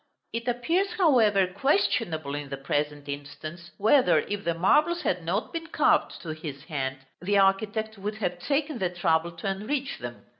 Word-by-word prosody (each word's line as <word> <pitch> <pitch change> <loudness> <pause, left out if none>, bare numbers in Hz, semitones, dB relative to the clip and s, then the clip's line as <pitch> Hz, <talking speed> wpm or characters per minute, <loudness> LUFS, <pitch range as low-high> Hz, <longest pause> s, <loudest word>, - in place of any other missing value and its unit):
It 230 +1 -3
appears 330 +12 +1
however 225 - +4
questionable 185 - 0
in 145 -1 -4
the 140 - -4
present 145 +1 -2
instance, 150 +4 -7
whether, 245 +6 +5
if 205 0 -4
the 170 -1 0
marbles 305 - +3
had 180 - 0
not 185 +7 -2
been 330 -1 -4
carved - - +2
to 165 - -6
his 155 -3 -6
hand, 135 -4 -3 0.2
the 200 +3 +1
architect 215 +2 +1
would 210 +2 -3
have 180 -5 -2
taken 285 - -1
the 185 -2 +1
trouble 170 -1 +1
to 165 +4 -6
enrich 225 +8 -2
them. 120 -1 -8
195 Hz, 165 wpm, -27 LUFS, 155-235 Hz, 0.2 s, whether